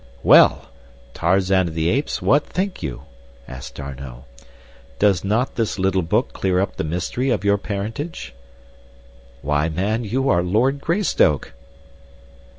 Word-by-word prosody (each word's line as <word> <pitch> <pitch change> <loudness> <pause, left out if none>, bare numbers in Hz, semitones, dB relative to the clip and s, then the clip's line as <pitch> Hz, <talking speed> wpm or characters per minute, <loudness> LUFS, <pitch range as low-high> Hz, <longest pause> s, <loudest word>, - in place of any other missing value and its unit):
"Well! - - +5 0.4
Tarzan 95 +1 +2
of 80 - -7
the 80 0 0
Apes, 140 +8 -1
what 145 +2 +4
think 185 +2 -3
you?" 70 -7 -5 0.4
asked 65 -1 -9
D'Arnot. 70 -3 -8 0.7
"Does 100 -4 +2
not 110 +6 0
this 115 -4 -1
little 95 0 +1
book 80 - 0
clear 90 -1 0
up 100 - -2
the - - -2
mystery 90 +11 -2
of 120 - 0
your 100 0 +3
parentage? 105 - -5 1.1
"Why 75 +2 +1
man, 100 +8 -1
you 130 +6 -1
are 85 -8 +3
Lord 120 +10 +1
Greystoke." 170 - +1
95 Hz, 135 wpm, -21 LUFS, 80-120 Hz, 1.1 s, Well